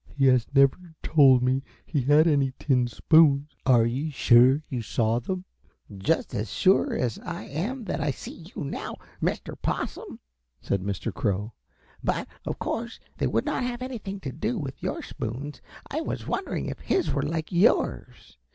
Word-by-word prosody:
"He 135 - +3
has 125 -3 +3
never 145 +5 +3
told 135 -5 +6
me 130 +1 +2 0.2
he 145 -5 -1
had 145 +5 +5
any 140 -5 +2
tin 125 -4 +2
spoons. 145 +3 +4 0.2
Are 120 -3 +6
you 130 +7 -1
sure 130 +1 +5
you 130 -6 -3
saw 115 +1 0
them?" 185 +9 -4 0.5
"Just 100 +13 0
as 105 +2 -3
sure 190 +1 +3
as 120 -3 -1
I 175 0 -6
am 215 - -4
that 200 - -3
I 150 - 0
see 160 +4 -7
you 185 - -4
now, 140 - -5 0.3
Mr. - - -2
Possum," - - -3 0.4
said 100 - -1
Mr. 100 -1 -3
Crow. 105 +3 -1 0.5
"But, - - -1 0.2
of - - -2
course, - - -4 0.2
they - - +2
would 115 +2 0
not - - -1
have 245 0 -3
anything 215 -6 -5
to 135 - -4
do 220 - -2
with 135 -7 -6
your - - -3
spoons. 130 +5 -6 0.3
I 305 +3 -3
was - - -4
wondering 380 - -2
if - - -5
his 380 - 0
were 140 - 0
like 155 +2 -3
yours. 180 +6 +1
140 Hz, 170 wpm, -26 LUFS, 125-170 Hz, 0.5 s, told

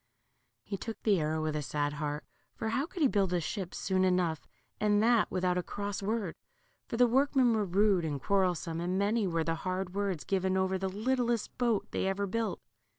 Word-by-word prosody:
He 200 - -4
took 225 +3 -6
the 205 -5 +3
arrow 155 0 -1
with 155 -1 -1
a 150 - -1
sad 145 +1 -1
heart, 150 0 -3 0.3
for 220 - -3
how 270 +7 0
could 350 -2 -2
he - - +7
build 195 -6 +1
a 175 - +2
ship 180 +2 -4
soon 185 -1 +1
enough, 180 -4 +1 0.3
and 205 -1 +3
that 235 -1 +4
without 180 -1 +1
a - - 0
cross 205 +2 -4
word? 205 -3 -1 0.5
for 230 - -3
the 245 - +6
workmen 260 0 +3
were 215 -2 +1
rude 195 0 +3
and 145 -3 -2
quarrelsome, 180 -2 0
and 180 +2 -1
many 205 +1 +1
were 165 -2 0
the 165 +1 0
hard 185 -1 -2
words 195 -5 -1
given 190 -1 0
over 190 0 +1
the 190 0 -1
littlest 235 +2 0
boat 235 -4 +2
they - - -1
ever 195 +1 0
built. 220 0 -2
195 Hz, 205 wpm, -31 LUFS, 180-220 Hz, 0.5 s, he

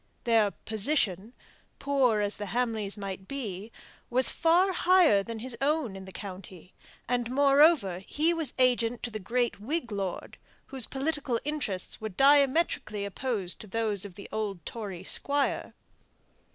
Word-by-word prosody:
Their 225 -4 +3
"position" 220 - -1 0.4
poor 260 -6 +2
as 205 0 -1
the 205 - -5
Hamleys 220 -2 -1
might 195 -1 -6
be 220 -6 -5 0.4
was 255 +1 +3
far 350 +3 +3
higher 350 - +5
than 230 +3 -6
his 240 +2 -4
own 285 -7 0
in 190 0 -8
the 190 - -10
county; 185 -2 -9 0.3
and, 245 -1 0
moreover, 275 - +4
he 305 - 0
was 320 -6 -2
agent 245 -2 +2
to 240 - -3
the 215 - -5
great 240 +4 -1
Whig 250 +3 -3
lord, 195 -3 -4 0.3
whose 265 -3 -1
political 270 -3 -2
interests 265 -14 -2
were 220 - -3
diametrically 275 - +3
opposed 200 -3 -3
to 215 - -9
those 210 -1 -1
of 200 -3 -5
the 200 - -9
old 205 -6 -4
Tory 200 -6 -6
squire. 285 +7 -1
230 Hz, 145 wpm, -28 LUFS, 200-275 Hz, 0.4 s, higher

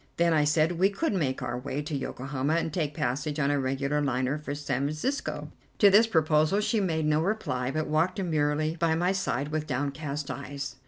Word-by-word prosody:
Then, 170 -1 +3
I 150 -2 +3
said, 155 +3 +2
we 190 +2 +5
could 210 +7 -1
make 140 -9 -1
our 120 +1 -3
way 140 +2 -4
to 150 0 -4
Yokohama 135 +2 -2
and 165 -2 -1
take 150 -4 -1
passage 145 +1 -2
on 145 -2 +2
a 145 - +1
regular 135 +2 0
liner 130 +1 0
for 145 -1 -5
San 140 -2 -2
Francisco. 155 - -3 0.3
To 200 -2 +6
this 220 +3 +6
proposal 155 0 +3
she 215 +1 +1
made 160 -5 0
no 150 0 +2
reply, 160 - -1
but 155 +3 -1
walked 160 +4 +1
demurely 155 -4 0
by 165 -1 +2
my 175 +3 +1
side 150 -7 -1
with 155 0 -2
downcast 145 +1 -3
eyes. 140 0 -6
150 Hz, 200 wpm, -28 LUFS, 140-165 Hz, 0.3 s, To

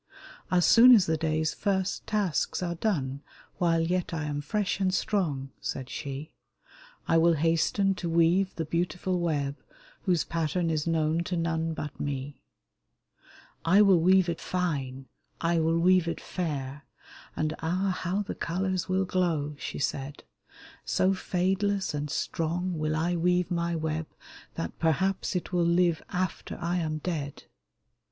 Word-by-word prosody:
" - - -18
As 175 -2 +4
soon 245 +5 +9
as 200 -5 +4
the 160 - +1
day's 155 0 0
first 195 -2 -1
tasks 200 -4 0
are 170 -1 -1
done, 145 -8 -1 0.4
While 165 -2 +3
yet 175 +1 -1
I 160 - -2
am 145 -1 -2
fresh 200 +7 -1
and 190 -1 +2
strong," 155 -10 -1
said 130 -1 -4
she, 140 +1 -6 0.4
*' - - -24
I 165 - +4
will 170 +1 +5
hasten 165 +5 +2
to 170 - -3
weave 170 +3 +3
the 165 - -2
beautiful 175 +3 -1
web 145 -4 -1 0.5
Whose 180 -5 +2
pattern 165 +1 -1
is 155 0 -1
known 160 0 +1
to 180 - -2
none 165 -1 -1
but 150 -2 -6
me! 140 0 -4 0.6
" - - -27
I 190 +6 +6
will 195 -4 +5
weave 185 +2 +4
it 170 -1 -3
fine, 140 -8 -2 0.3
I 170 0 +1
will 165 +1 +2
weave 180 0 +4
it 165 - -2
fair, 145 -5 -4 0.5
And 155 0 -1
ah! 180 +3 0
how 185 +4 -1
the - - -5
colors 185 +2 -2
will 190 +1 +1
glow! 165 -6 0
" - - -25
she - - -5
said; 140 0 -3 0.3
" - - -18 0.2
So 190 +1 +2
fadeless 190 +1 0
and 145 0 -3
strong 170 +4 -2
will 155 0 0
I 170 +3 0
weave 180 +1 +1
my 170 0 0
web 160 0 -2 0.5
That 85 - -5
perhaps 185 +5 +1
it 180 0 -3
will 175 - +2
live 170 -1 +2
after 185 -1 -3
I 175 +1 -1
am 155 -3 -1
dead." 150 -4 -4
170 Hz, 160 wpm, -28 LUFS, 155-185 Hz, 0.6 s, soon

